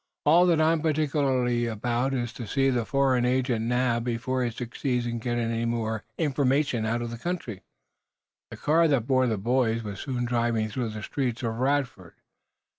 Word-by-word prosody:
"All 170 +4 +6
that 170 -3 +3
I'm 160 0 +3
particular 145 -4 +1 0.2
about 120 +4 -1
is 120 -2 -3
to 120 -2 -7
see 135 +3 +2
this 120 -3 -1
foreign 135 -3 +2
agent 125 -2 +1
nabbed 125 -1 +1
before 125 +2 -1
he 120 - 0
succeeds 120 +1 -3
in 120 0 -3
getting 120 0 -1
any 115 -1 -1 0.2
information 135 -5 +1
out 120 +1 -1
of 120 - -5
the 120 - -7
country." 145 - -4 0.9
The - - -9
car 165 +3 +3
that 135 -7 +1
bore 130 -1 +2
the 110 -3 0
boys 115 +1 +1
was 100 -2 -6
soon 125 -3 -2
driving 115 -2 0
through 115 +1 -3
the 105 -1 -7
streets 125 -3 -2
of 115 -1 -1
Radford. 130 - -1
125 Hz, 175 wpm, -26 LUFS, 115-135 Hz, 0.9 s, All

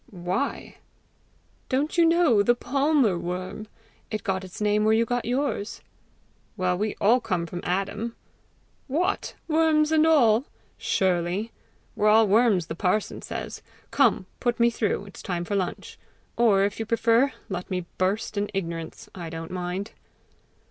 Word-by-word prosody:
"Why?" 185 +8 -3 0.9
"Don't 280 +3 0
you 340 -1 +5
know 330 -10 +4
the 240 +4 +3
palmer 270 - +2
worm? 185 +5 -5 0.4
It 215 -2 -4
got 190 -1 -1
its 185 -1 -9
name 210 0 +2
where 220 +1 +4
you 230 +1 +3
got 245 +1 -2
yours!" 245 -4 -2 0.8
"Well, 185 -1 +1
we 210 +3 -2
all 230 +5 +4
come 180 -7 -2
from 175 +1 -6
Adam!" 195 +5 -2 0.7
"What! 350 +9 -1
worms 315 -1 +3
and 315 0 +4
all?" 245 -6 +4 0.3
"Surely. 185 +3 0 0.4
We're 210 - +2
all 220 0 +6
worms, 205 -4 +3
the 160 - -5
parson 185 +5 -1
says. - - -6 0.3
Come, 240 -9 +3
put 240 -2 0
me 235 0 +4
through; 210 -3 -1
it's 195 - -11
time 175 -2 -3
for 205 - -4
lunch. 185 -3 -3 0.4
Or, 210 -5 +4
if 200 +2 -1
you 225 - -3
prefer, 230 +3 +3 0.2
let 185 -4 -5
me 180 -2 -2
burst 200 +3 -1
in 205 - -2
ignorance. 165 -3 -5
I 170 -3 -7
don't 165 0 -7
mind." 180 +3 -4
210 Hz, 150 wpm, -25 LUFS, 185-240 Hz, 0.9 s, all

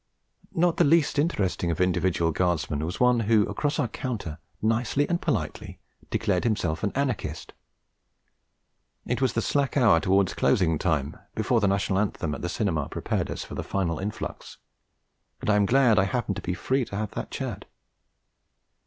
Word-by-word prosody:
Not 175 0 +2
the - - +5
least 150 -1 +3
interesting 100 - 0
of 85 - -2
individual 90 -2 +1
Guardsmen 80 -3 0
was 85 +4 -4
one 125 -1 +4
who 110 -1 +3
across 145 +8 -1
our - - +1
counter 110 - -5 0.2
nicely 115 +6 +1
and 175 0 -1
politely - - -3 0.3
declared 100 -5 0
himself 90 -9 0
an 100 - 0
anarchist. 135 -4 -2 1.5
It 125 +2 -2
was 130 -3 +2
the 115 - 0
slack 140 -1 0
hour 115 -11 +5
towards 95 +2 +2
closing 85 -10 +2
time, 75 -4 -1 0.2
before 120 - +2
the 105 - +2
National 95 0 +1
Anthem 95 -7 -1
at - - -6
the 85 - -2
cinema 90 -8 -1
prepared - - -2
us - - -4
for - - -10
the - - -3
final 85 -5 -1
influx, 105 +3 -6 0.8
and - - 0
I - - +4
am 100 -1 +3
glad 125 -3 +4
I 95 - +3
happened 105 -2 -2
to - - -5
be 90 - -2
free 130 +9 0
to 100 - -8
have 105 0 -3
that - - -5
chat. - - -5
105 Hz, 170 wpm, -26 LUFS, 90-125 Hz, 1.5 s, the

